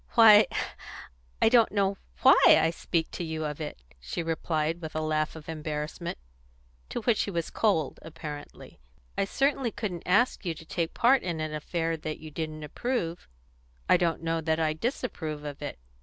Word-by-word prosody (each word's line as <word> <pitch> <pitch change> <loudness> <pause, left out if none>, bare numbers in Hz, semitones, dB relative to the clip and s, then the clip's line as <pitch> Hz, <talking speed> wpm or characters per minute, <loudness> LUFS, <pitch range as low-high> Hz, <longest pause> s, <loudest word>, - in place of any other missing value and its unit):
"Why, 220 -2 +9 1.0
I - - +7
don't 230 -2 +5
know 200 -1 +1 0.3
why - - +8
I 165 - +6
speak 165 -1 -2
to - - -4
you 160 -1 -3
of 150 +1 -4
it," 150 - -6 0.2
she - - -4
replied 165 0 -1
with 160 -1 -7
a - - +1
laugh 155 0 0
of 155 -2 -11
embarrassment, 155 +1 -4 0.7
to - - -3
which 225 -1 +2
he - - -1
was 170 -4 -3
cold, 165 -10 +1
apparently. 155 -2 -9 0.4
"I - - +1
certainly 270 +3 +1
couldn't 190 -6 -4
ask 205 +8 +3
you 170 -4 -2
to 160 - -12
take 165 0 -2
part 255 +2 +5
in 170 -3 -3
an 155 -1 -3
affair 165 +2 -2
that 155 0 -5
you 155 0 -10
didn't 155 0 -5
approve." 175 - -3 0.6
"I - - +6
don't 170 -2 0
know 165 0 0
that 160 0 0
I 155 -1 +2
disapprove 160 - -3
of 145 -1 -7
it. 145 - -5
165 Hz, 175 wpm, -28 LUFS, 155-195 Hz, 1.0 s, Why